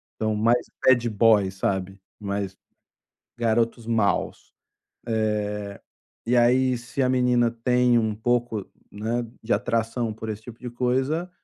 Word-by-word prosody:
Então, 110 -1 -1
mais 115 +3 +2 0.2
bad 120 -2 +4
boy, 105 -2 +4
sabe. 95 0 -2 0.2
Mais 100 -1 -4 0.8
garotos 115 0 0
maus. 115 -3 0 0.5
Eh, 105 -2 -2 0.5
e 120 +2 +2
aí 125 +1 +3
se 120 +3 -4
a 130 - +2
menina 125 -2 +3
tem 125 +1 +2
um 110 -2 -1
pouco 115 -2 -1 0.3
né, 115 +3 -2 0.2
de 110 - +1
atração 115 +1 -1
por 110 +1 -7
esse 110 0 -5
tipo 115 0 -11
de 125 - -6
coisa, 130 +8 -1
115 Hz, 130 wpm, -24 LUFS, 105-120 Hz, 0.8 s, bad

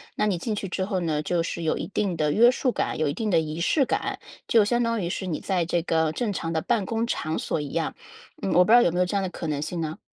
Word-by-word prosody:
那 210 - +1
你 200 -4 +1
进 215 +3 -2
去 200 - -4
之 185 +1 -2
后 190 -2 -1
呢， 155 -3 0
就 170 +2 0
是 170 - -4
有 160 - 0
一 - - -3
定 195 -3 -1
的 150 -1 +1
约 235 +3 +7
束 255 0 0
感、 - - -2
有 155 - +1
一 145 - 0
定 220 +6 -2
的 170 -4 +4
仪 155 0 -4
式 275 - +3
感， - - -2 0.3
就 225 -3 +5
相 240 +3 +1
当 230 -1 0
于 170 - -2
是 190 - -3
你 160 -4 -2
在 180 -4 0
这 175 +1 0
个 160 -2 +1
正 210 +4 -1
常 165 -3 -3
的 160 - 0
办 225 -1 0
公 225 0 0
场 160 -8 -2
所 - - -2
一 145 - -4
样。 165 -1 -1 0.5
嗯， 190 - -1
我 180 +2 +6
不 215 - +1
知 - - +9
道 245 - +8
有 240 - +4
没 175 - -2
有 180 - +4
这 180 - -3
样 - - +1
的 - - -1
可 170 - -6
能 145 -2 -2
性 170 +3 -3
呢？ 155 -1 -4
180 Hz, 330 characters per minute, -25 LUFS, 160-210 Hz, 0.5 s, 知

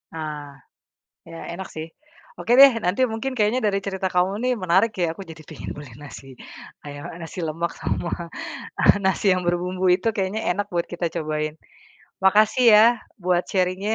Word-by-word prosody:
Ah, 150 -3 -6 0.7
ya 165 0 -9
enak 190 +2 -7
sih, 155 0 -6 0.5
oke 235 - -1
deh 275 - +12 0.2
nanti 180 +7 0
mungkin 225 +4 -3
kayaknya 220 +3 +2
dari 200 -1 +1
cerita 190 -1 -2
kamu 180 +2 +2
nih 255 - +2
menarik 190 +5 +3
ya 175 - +3
aku - - -8
jadi 160 0 -11
pengen - - -8
beli 145 -1 -9
nasi 140 -1 -11 0.6
ayam, 145 0 -8
eee, 170 - -9
nasi 165 - -10
lemak 165 +2 -3
sama 170 - -2 1.0
nasi 190 +2 0
yang 185 - -2
berbumbu 180 +2 -1
itu 185 +5 -4
kayaknya 195 +2 -1
enak 205 +1 -1
buat 170 -1 -1
kita 175 0 -2
cobain, 155 -1 -2 0.7
makasih 215 +6 +4
ya 210 - +8 0.4
buat 180 0 +2
sharing-nya. 190 +3 0
180 Hz, 165 wpm, -23 LUFS, 165-205 Hz, 1.0 s, deh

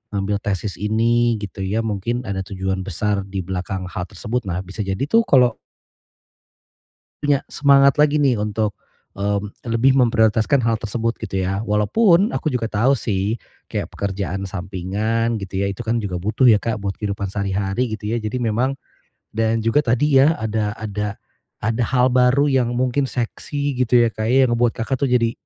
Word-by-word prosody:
ngambil 100 +1 0
tesis 100 0 -3
ini 115 +3 +2
gitu 100 -1 -7
ya, 105 +4 0
mungkin 110 +3 -2
ada 100 -4 -3
tujuan 95 0 -3
besar 100 +2 -1
di 95 -1 -4
belakang 95 +1 -4
hal 90 +1 -4
tersebut. 110 +5 -4
Nah 90 0 -2
bisa 95 +3 -12
jadi 95 0 -3
tuh 230 +4 +4
kalau 125 -4 +4 1.6
Ya, 145 -2 +1
semangat 140 0 +5
lagi 150 0 +4
nih 140 -3 +3
untuk, 105 0 -1 0.4
mmm, 100 +1 -2 0.2
lebih 115 +4 +3
memprioritaskan 115 0 +3
hal 115 - +2
tersebut 115 +2 -1
gitu 95 -3 -4
ya. 95 +2 -1
Walaupun, 170 - +3
aku 155 - -1
juga 125 -4 -1
tahu 115 +6 +2
sih 105 +1 -1 0.3
kayak - - -4
pekerjaan 95 -1 -3
sampingan 100 +5 -2
gitu 95 -1 -4
ya, 100 - 0
itu 100 - -6
kan 115 +1 0
juga 95 -4 -3
butuh 110 +8 +3
ya, 110 - +6
Kak, 110 0 -3
buat 100 -1 -3
kehidupan 100 -2 -3
sehari-hari 100 +4 -1
gitu 105 -1 -5
ya. 115 - 0
Jadi 115 +3 -3
memang 120 +4 0 0.6
dan 110 0 0
juga 115 +6 +3
tadi 135 +1 +3
ya, 155 +4 +4
ada 110 -1 -2
ada 105 -1 -4 0.5
ada 115 +2 +1
hal 125 +1 +2
baru 125 +3 +4
yang 120 -2 +1
mungkin 130 +2 0
seksi 140 +3 -3
gitu 120 -1 +4
ya, 115 - 0
Kak, 110 +1 -3
ya, 130 +2 +5
yang 120 - +1
membuat 120 -1 +1
kakak 130 +3 -2
tuh 140 - +2
jadi 120 -2 +2
110 Hz, 175 wpm, -21 LUFS, 100-125 Hz, 1.6 s, ya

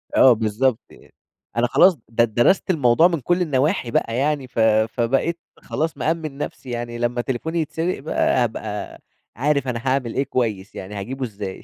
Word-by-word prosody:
آه 130 -2 +7
بالضبط 110 +3 0
يعني، - - -19 0.4
أنا 120 +1 +3
خلاص 180 +7 +5
د 115 +1 +1
درَست 155 - +3
الموضوع 155 0 +4
من 165 -6 -2
كل 175 +6 +1
النواحي 145 -3 0
بقى 115 +1 0
يعني 140 -1 0
ف 120 - -5
فبقيت 115 +8 +2 0.2
خلاص 160 +1 -3
مأمِّن 155 -3 -2
نفْسي 135 -3 -6
يعني، 120 0 -4
لما 120 +1 -1
تليفوني 160 +7 -2
يتسرَق 165 +3 -2
بقى 135 -3 +1
هابقى 110 -2 -5 0.4
عارف 140 +1 0
أنا 120 -2 -2
هاعمل 130 -3 0
إيه 135 - +1
كويس، 105 -6 -2
يعني 95 +2 -7
هاجيبه 130 +7 -5
إزاي 100 -4 -7
125 Hz, 165 wpm, -22 LUFS, 115-150 Hz, 0.4 s, آه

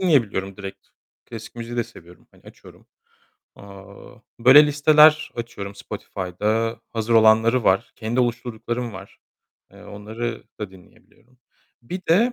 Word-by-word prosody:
dinleyebiliyorum 110 - +1
direkt, 100 -1 -9 0.4
klasik 115 -1 -10
müziği 120 +1 -7
de 120 - 0
seviyorum, 85 +1 -17
hani, - - -24
açıyorum. - - -17 0.7
Aaa, 100 +4 -14 0.2
böyle, 140 +5 +8
listeler 150 +1 +5
açıyorum 100 -4 -7
Spotify'da. 105 +5 -3
Hazır 115 0 -1
olanları 110 +2 +4
var. 95 +1 +2
Kendi 120 +3 -1
oluşturduklarım 120 0 -3
var. 95 +1 -12 0.5
Eee, - - -15
onları 110 +3 -6 0.2
da 105 -3 -5
dinleyebiliyorum. 115 +6 -22 0.4
Bir 180 +10 -6
de, 230 +9 +4
115 Hz, 120 wpm, -22 LUFS, 100-125 Hz, 0.7 s, böyle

